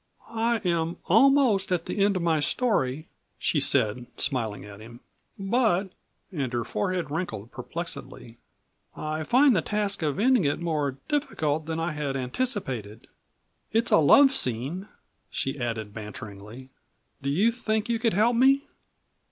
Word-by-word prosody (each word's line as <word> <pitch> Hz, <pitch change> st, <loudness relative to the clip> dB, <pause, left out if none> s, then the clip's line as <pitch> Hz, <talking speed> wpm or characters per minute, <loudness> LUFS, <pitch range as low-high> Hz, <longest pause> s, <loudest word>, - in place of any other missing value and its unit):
"I 230 Hz, 0 st, 0 dB
am 170 Hz, -1 st, 0 dB
almost 225 Hz, -3 st, +4 dB
at 175 Hz, -2 st, 0 dB
the 200 Hz, -, 0 dB
end 200 Hz, 0 st, +3 dB
of 180 Hz, -, -1 dB
my 165 Hz, -2 st, +2 dB
story," 150 Hz, -, 0 dB, 0.3 s
she 150 Hz, -, 0 dB
said 125 Hz, -3 st, +1 dB
smiling 115 Hz, -7 st, -2 dB
at 105 Hz, 0 st, -11 dB
him. 120 Hz, +2 st, -12 dB, 0.4 s
"But," 195 Hz, -2 st, +1 dB, 0.4 s
and 140 Hz, -8 st, -3 dB
her 120 Hz, -1 st, 0 dB
forehead 160 Hz, -, -2 dB
wrinkled 120 Hz, -, -4 dB
perplexedly, 125 Hz, -4 st, -7 dB, 0.6 s
"I 155 Hz, +1 st, -3 dB
find 255 Hz, -, +5 dB
the 170 Hz, -, +2 dB
task 205 Hz, +2 st, -1 dB
of 150 Hz, -1 st, -1 dB
ending 245 Hz, 0 st, +4 dB
it 145 Hz, -, 0 dB
more 150 Hz, -5 st, -1 dB
difficult 160 Hz, -, -1 dB
than 160 Hz, 0 st, -2 dB
I 165 Hz, +1 st, -1 dB
had 145 Hz, -2 st, -3 dB
anticipated. 130 Hz, -, -3 dB, 0.6 s
It's 225 Hz, +2 st, +1 dB
a -, -, +7 dB
love 270 Hz, -, +6 dB
scene," 140 Hz, -, -3 dB, 0.4 s
she 135 Hz, +1 st, -3 dB
added 115 Hz, -4 st, -3 dB
banteringly; 105 Hz, +3 st, -9 dB, 0.5 s
"do 140 Hz, -, -2 dB
you 195 Hz, +11 st, +3 dB
think 220 Hz, -2 st, -1 dB
you 235 Hz, -1 st, 0 dB
could 225 Hz, -1 st, +1 dB
help 230 Hz, +4 st, +3 dB
me?" 270 Hz, +3 st, +4 dB
165 Hz, 145 wpm, -26 LUFS, 130-215 Hz, 0.6 s, a